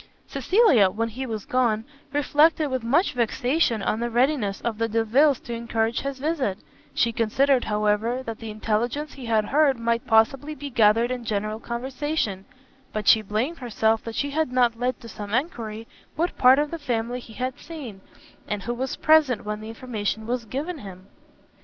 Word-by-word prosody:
Cecilia, 275 - +4
when 225 +4 -2
he 260 +4 -5
was 220 -3 -5
gone, 230 -4 +1 0.3
reflected 295 +1 +3
with 260 -1 -1
much 295 +11 +2
vexation 245 0 +1
on 215 - 0
the 240 0 -1
readiness 240 -4 +1
of 225 -2 -3
the 230 0 0
Delviles 230 +6 +3
to 240 - -6
encourage 230 0 -1
his 275 -1 -4
visit; 275 - -1 0.4
she 235 - +2
considered, 250 +4 +2
however, 210 +4 0
that 225 -3 -6
the 225 - -7
intelligence 235 +7 -2
he 260 -4 -9
had 220 -2 +2
heard 280 +2 +3
might 230 0 -1
possibly 265 +7 +2
be 285 0 -7
gathered 230 0 +4
in 250 -1 -3
general 215 0 -2
conversation; 245 -4 -3 0.5
but 215 -1 -4
she 220 - +7
blamed 220 +11 -2
herself 225 -2 0
that 230 -1 -6
she 285 0 -1
had 310 -2 0
not 240 -2 +2
led 250 +1 -1
to 230 - -10
some 210 -1 -5
enquiry 230 -6 -3 0.3
what 340 +4 -1
part 255 +1 +6
of 295 0 0
the 335 - -4
family 245 -3 -2
he 230 -2 -13
had 255 +4 -4
seen, 260 - -9 0.5
and 210 -1 -3
who 240 - -2
was 260 +2 -3
present 310 -8 +3
when 210 0 -4
the 215 - -8
information 220 -2 -4
was 240 0 -2
given 295 - -4
him. 190 -3 -11
235 Hz, 180 wpm, -24 LUFS, 220-275 Hz, 0.5 s, she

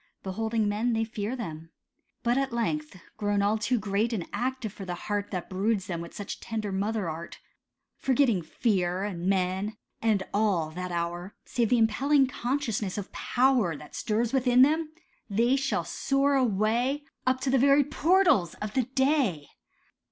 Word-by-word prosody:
Beholding 220 +3 -1
men, 220 +4 0
they 225 0 +1
fear 220 +1 -3
them. 165 -9 -6 0.5
But 240 +1 +2
at 270 -1 0
length, 235 -1 -2 0.2
Grown 205 -1 +1
all 210 +2 +2
too 225 +4 +1
great 210 +2 0
and 185 -7 -2
active 250 -4 -2
for 200 - -8
the 180 -2 -4
heart 205 +2 -3
That 180 -3 -4
broods 195 +1 0
them 170 -2 -4
with 170 - -9
such 205 - -6
tender 220 -3 -4
mother 200 0 -1
art, 165 +1 -6 0.6
Forgetting 255 -7 +2
fear, 180 +1 0
and 180 -3 -3
men, 190 +2 0 0.2
and 215 -4 +2
all, 195 -7 +1
that 180 +2 -5
hour, 175 +2 -3
Save 235 -3 0
the 245 - +4
impelling 270 +6 +3
consciousness 240 -6 -2
of 205 - -5
power 245 - +2
That 150 - -12
stirs 225 +2 -1
within 255 -1 +5
them—they 295 - 0
shall 275 0 0
soar 275 +1 +1
away 245 +3 +1 0.2
Up 255 0 +3
to 260 - 0
the 265 - +4
very 280 +2 +5
portals 310 - +3
of 210 0 -5
the 260 -3 +1 0.2
Day. 240 - +1
220 Hz, 160 wpm, -28 LUFS, 190-255 Hz, 0.6 s, within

